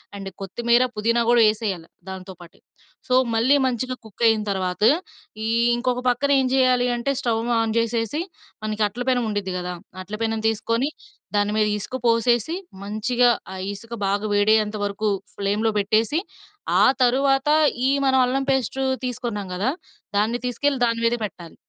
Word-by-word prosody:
And 195 -1 -6
కొత్తిమీర, 235 +5 +2
పుదీనా 230 +3 +1
గూడా 240 -1 +5
యేసేయాలి 205 -6 -2 0.2
దానితో 190 0 -7
పాటే. 170 -1 -15 0.5
సో, 255 - +2 0.2
మళ్ళీ 235 +5 +4
మంచిగా 255 0 -1
కుక్కయిన 220 +1 +2
తర్వాత, 185 -1 -2 0.6
ఈ - - -1 0.3
ఇంకొక 250 +1 -1
పక్కన 270 +4 +1
ఏం 260 - +1
జేయాలీ 255 -2 +3
అంటే 240 +4 -1
స్టవ్ 230 -2 0 0.2
ఆన్ 225 -1 0
జేసేసి 230 +5 0 0.4
మనకి 215 0 -1
అట్ల 235 +5 -5
పెనం 250 -1 +2
ఉండిద్ది 205 -3 -3
గదా! 180 0 -4 0.3
అట్ల 205 +3 -6
పెనం 225 -1 -1
తీసుకొని 230 +4 0 0.5
దాని 205 0 +1
మీద 215 -1 +3
ఇసుక 230 - -6
పోసేసి, 235 +5 +2 0.3
మంచిగా 240 +4 +2 0.2
ఆ - - -6 0.2
ఇసుక 230 +3 -10
బాగా 200 +2 0
వేడయ్యేంత 215 +1 +3
వరకు 205 +1 -1 0.3
ఫ్లేమ్‌లో 205 +3 0
పెట్టేసి, 220 +9 +1 0.6
ఆ - - +7 0.2
తర్వాత 270 +3 +2 0.4
ఈ - - +3 0.2
మనం 265 -1 +4
అల్లం 270 +2 0
పేస్టు 265 0 -1 0.2
తీసుకున్నాం 235 -5 -4
కదా! 205 +8 0 0.5
దాన్ని 225 +4 +1
తీసుకెళ్ళి 270 +3 0
దాని 230 -1 0
మీదే 235 +1 +1
పెట్టాలి. 175 -4 -10
230 Hz, 150 wpm, -23 LUFS, 205-250 Hz, 0.6 s, ఆ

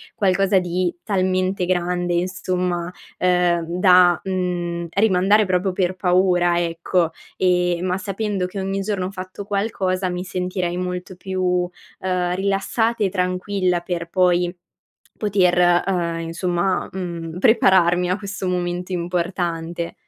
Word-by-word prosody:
qualcosa 195 -1 +3
di 180 0 -1
talmente 185 -2 0
grande, 175 0 0
insomma, 180 -1 -1 0.3
ehm, 180 -2 +2
da, 180 -2 +6
mhmm, 175 -3 -2
rimandare 205 +1 +4
proprio 185 0 +1
per 185 0 0
paura 180 -1 +2
ecco, 170 0 0 0.3
e 180 -1 +2
ma 185 0 0
sapendo 195 0 -2
che 185 +2 -6
ogni 195 +1 -2
giorno 195 -2 -2
ho - - -3
fatto 185 +1 -7
qualcosa, 195 -2 -1
mi 180 0 -3
sentirei 180 -1 -3
molto 180 0 -4
più, 180 -1 -1 0.3
ehm, 180 -1 -1
rilassata 200 +4 0
e 195 - +2
tranquilla 185 0 0
per 170 -1 -4
poi 180 -1 +2 0.6
poter, 190 -4 +2 0.3
ehm, 170 -3 -1
insomma, 175 +2 -1
mhmm, 170 -2 -5
prepararmi 185 -6 +4
a 185 - +1
questo 200 -2 -5
momento 180 0 -2
importante. 170 -1 -2
180 Hz, 125 wpm, -21 LUFS, 175-190 Hz, 0.6 s, da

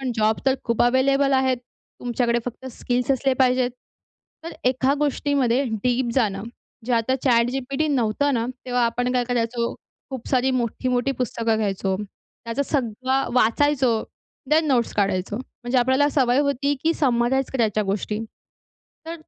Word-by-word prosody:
पण 260 -2 -2
जॉब 220 -1 +1
तर 265 - +4
खूप 235 -2 +1
अवेलेबल 275 +3 +3
आहेत. 260 -1 +2 0.4
तुमच्याकडे 240 -1 0
फक्त 245 +1 -7
स्किल्स 245 +1 -1
असले 270 0 +2
पाहिजेत. 250 0 +2 0.7
तर 335 - -6
एका 260 +2 +2
गोष्टीमध्ये 280 -3 +1 0.2
डीप 245 -1 +1
जाणं, 205 -6 +1 0.4
जे 250 - 0
आता 230 +2 +1
ChatGPT 255 +4 +1
नव्हतं 255 +3 +1
ना 230 - 0 0.2
तेव्हा 245 -1 +1
आपण 245 +2 -1
काय 250 -1 +1
करायचो, 235 -1 -1 0.4
खूप 260 -3 -6
सारी 260 0 +2
मोठी-मोठी 250 +1 0
पुस्तकं 230 -2 0
घ्यायचो. 195 -2 -1 0.5
त्याचं 230 +5 -1
सगळं 260 0 -1
वाचायचो, 250 0 +2 0.5
थेन 315 +1 +4
नोट्स 245 -3 +1
काढायचो. 195 0 0
म्हणजे 245 +1 -3
आपल्याला 260 +4 +3
सवय 255 -3 +2
होती, 280 0 0
की 330 - +4
समराइज 260 -1 +1
करायच्या 220 -4 +1
गोष्टी. 205 +2 -2 0.9
तर 330 - -4
250 Hz, 140 wpm, -23 LUFS, 235-265 Hz, 0.9 s, तर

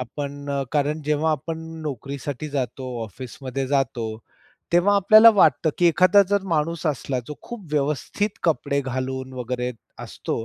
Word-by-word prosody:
आपण, 140 +3 -6 0.2
कारण 150 +1 0
जेव्हा 150 +2 +1
आपण 160 +3 -4 0.2
नोकरीसाठी 140 +1 -5
जातो, 130 -2 -3 0.2
ऑफिसमध्ये 130 +4 -6
जातो, 135 -4 0 0.7
तेव्हा 195 +4 +4
आपल्याला 215 +4 +8
वाटतं, 160 - +4
की 175 - +4
एखादा 185 +5 +5
जर 200 -1 +2
माणूस 160 +2 -1
असला 135 -2 -1
जो 150 - -6
खूप 235 -6 -9
व्यवस्थित 150 - -1
कपडे 145 -3 +1
घालून 130 0 -4
वगैरे 125 +1 -2 0.3
असतो, 115 - -4
145 Hz, 130 wpm, -23 LUFS, 130-165 Hz, 0.7 s, आपल्याला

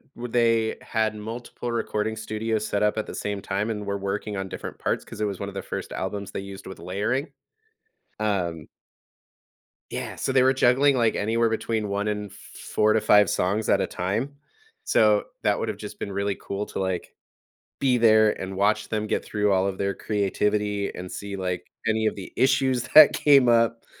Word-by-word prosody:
w 120 -1 -6
they 115 -2 +2
had 110 -1 0
multiple 115 +3 -6
recording 110 -1 -1
studios 110 0 -2
set 100 - -1
up 105 +1 +2
at 110 - -1
the - - -8
same 100 -1 -3
time 100 +3 -2
and 105 -2 -3
were 100 0 -2
working 100 +1 -3
on 95 - -3
different - - -7
parts- - - -1
'cause - - -11
it 105 - +1
was 100 -3 -3
one 100 - -3
of 100 - -12
the - - -3
first - - -6
albums 100 +1 -4
they - - -4
used 100 0 -9
with 95 -2 -9
layering. 105 - -2 0.9
Um 90 -7 -1 1.2
Yeah, - - -5
so - - -2
they 130 -1 +4
were 130 +1 +4
juggling, 135 +2 +4
like, 115 -3 +2
anywhere 115 +2 +1
between 110 -1 -1
1 100 +1 -1
and 105 -1 -3
4 105 +1 -1
to 110 - +2
5 105 -2 +5
songs 105 +4 0
at - - +4
a - - 0
time. 110 +11 -2 0.5
So, 105 - +4 0.2
that - - +2
would’ve - - -3
just - - -9
been 100 - -4
really 100 0 -1
cool 100 +1 -4
to, - - -5
like, 95 -2 -3 0.7
be 130 -2 +3
there 110 -2 +5
and 95 0 -5
watch 105 +2 +1
them 110 -1 -1
get - - -1
through 105 -1 0
all 95 0 +2
of 95 -1 -3
their 100 0 -1
creativity 105 0 -1
and 90 0 -7
see, 100 -1 -6
like, 90 -2 -3 0.2
any 110 -1 +2
of - - -1
the 95 - -9
issues 130 -2 +2
that 155 -2 +10
came 140 -4 +5
up. 115 -1 +3
105 Hz, 195 wpm, -25 LUFS, 100-115 Hz, 1.2 s, that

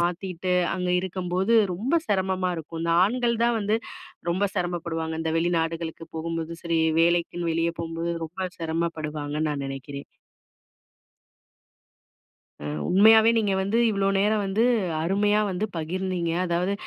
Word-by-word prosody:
மாத்தீட்டு 180 +1 -1 0.2
அங்க 180 -1 -2
இருக்கும்போது, 185 +2 -1 0.2
ரொம்ப 235 - -3 0.2
சிரமமா 190 -2 0
இருக்கும். 165 +1 -7
இந்த 170 0 +1
ஆண்கள் 235 +1 0
தான் 235 -1 +2
வந்து 210 +2 +1 0.6
ரொம்ப 190 +4 +1
சிரமப்படுவாங்க. 165 -2 -2
இந்த 160 0 -1
வெளிநாடுகளுக்கு 165 -1 -1
போகும்போது 165 0 -3
சரி, 170 -1 0 0.2
வேலைக்குன்னு 170 0 +1
வெளியே 165 +1 0
போகும்போது 165 +1 -3
ரொம்ப 185 +3 -4
சிரமப்படுவாங்கன்னு 155 -2 -2
நான் 140 -2 -3
நெனைக்கிறேன். 135 +1 -7 2.6
அ, - - -5 0.2
உண்மையாவே 220 +4 +7
நீங்க 210 -3 +2
வந்து 200 +4 0
இவ்ளோ 195 -2 0
நேரம் 210 +2 +2
வந்து, 195 +4 0 0.4
அருமையா 205 +5 +2
வந்து 190 +2 -2
பகிர்ந்தீங்க. 175 +1 -2
அதாவது 180 +2 0
175 Hz, 120 wpm, -25 LUFS, 165-195 Hz, 2.6 s, உண்மையாவே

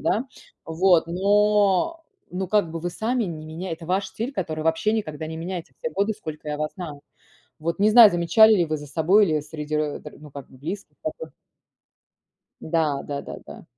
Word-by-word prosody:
да. 230 +5 0 0.4
Вот, 170 +1 +3
но, 205 - +2 0.3
ну, 185 +1 -3
как 205 -5 +2
бы 165 - -4
вы 175 +2 -3
сами 230 +5 -1
не 160 -4 -6
меня 165 +3 -5
это 165 0 -7
ваш 190 +2 0
стиль 235 +5 -5
который 160 - -3
вообще 165 +6 +1
никогда 160 -8 -3
не 160 0 -6
меняется 175 +1 -6
все 480 - -3
годы, 210 - 0
сколько 155 -6 -8
я 150 - -2
вас 155 0 -2
знаю". 155 -6 -7 0.6
Вот 165 +2 -2
не 210 +2 +5
знаю, 225 -2 +10
замечали 220 +6 +5
ли 175 -4 +2
вы 155 -1 -2
за 150 0 -10
собой 180 +8 +3
или 155 -2 +1
среди 150 0 -4
ро 150 -1 -2
др 150 - -11
ну, 150 -1 -13
как 140 -1 -10
бы 130 - -17
близких, 190 +9 -7
такое? 485 - -5 1.3
Да, 155 -4 0
да-да-да. 140 -1 -8
170 Hz, 185 wpm, -24 LUFS, 155-205 Hz, 1.3 s, знаю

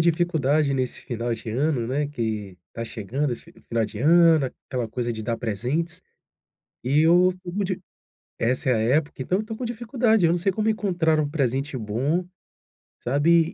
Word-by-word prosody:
dificuldade 160 -4 +2
nesse 130 -2 -2
final 120 -1 -2
de 110 0 -7
ano, 130 -1 0
né, 145 +3 0
que 110 -8 -4 0.2
tá 115 - -4
chegando 125 +6 -2
esse 120 - -9 0.2
final 115 -1 +1
de 105 -1 -7
ano, 165 0 +5 0.2
aquela 125 -3 -2
coisa 120 +1 -3
de 110 -1 -6
dar 115 +1 -1
presentes 135 - -2 0.8
e 135 +4 +3
eu 175 +3 +6
estou 180 -1 -6
com 205 +2 -1
di 185 -1 -2 0.6
essa 125 +3 +1
é - - +4
a 110 - +1
época. 140 +7 +1
Então 180 +9 0
eu - - 0
estou 220 +1 -6
com 250 - -5
dificuldade. 235 -3 +1
Eu - - +3
não 175 - +1
sei 190 +3 +1
como 215 +3 0
encontrar 175 -7 +1
um 150 -2 +1
presente 135 -1 -1
bom, 130 +11 -1 0.7
sabe, 160 +6 +3
145 Hz, 180 wpm, -24 LUFS, 120-175 Hz, 0.8 s, eu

